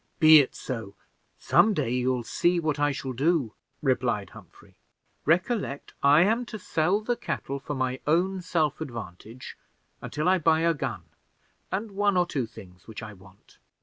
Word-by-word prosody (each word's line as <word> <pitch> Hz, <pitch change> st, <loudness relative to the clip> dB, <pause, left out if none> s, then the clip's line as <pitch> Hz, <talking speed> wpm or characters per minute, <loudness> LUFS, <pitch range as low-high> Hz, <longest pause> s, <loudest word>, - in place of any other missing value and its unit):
"Be 155 Hz, -1 st, +9 dB
it 140 Hz, -, 0 dB
so. 110 Hz, -6 st, -6 dB, 0.4 s
Some 215 Hz, -1 st, +3 dB
day 135 Hz, -8 st, -1 dB
you'll 125 Hz, 0 st, 0 dB
see 175 Hz, +8 st, +1 dB
what 155 Hz, -3 st, -1 dB
I 145 Hz, 0 st, +2 dB
shall 135 Hz, -1 st, -5 dB
do," 140 Hz, -3 st, +1 dB, 0.3 s
replied 120 Hz, -7 st, 0 dB
Humphrey. -, -, -16 dB, 0.5 s
"Recollect, 175 Hz, -, 0 dB
I 145 Hz, +3 st, +6 dB
am 225 Hz, +6 st, +2 dB
to 220 Hz, -, -6 dB
sell 185 Hz, +1 st, 0 dB
the 240 Hz, +3 st, -1 dB
cattle 140 Hz, -, -4 dB
for 145 Hz, +2 st, -5 dB
my 130 Hz, 0 st, -2 dB
own 185 Hz, +4 st, +1 dB
self 160 Hz, -4 st, -1 dB
advantage 115 Hz, -, -8 dB, 0.5 s
until 150 Hz, +4 st, -3 dB
I 185 Hz, 0 st, +4 dB
buy 160 Hz, 0 st, +3 dB
a 165 Hz, 0 st, +3 dB
gun, 125 Hz, -, -4 dB, 0.7 s
and 205 Hz, +3 st, -3 dB
one 200 Hz, -1 st, +1 dB
or 180 Hz, -, +3 dB
two 135 Hz, -8 st, -3 dB
things 90 Hz, -4 st, -15 dB
which 110 Hz, -1 st, -8 dB
I 105 Hz, -1 st, -8 dB
want." 95 Hz, 0 st, -20 dB
145 Hz, 165 wpm, -26 LUFS, 125-175 Hz, 0.7 s, Be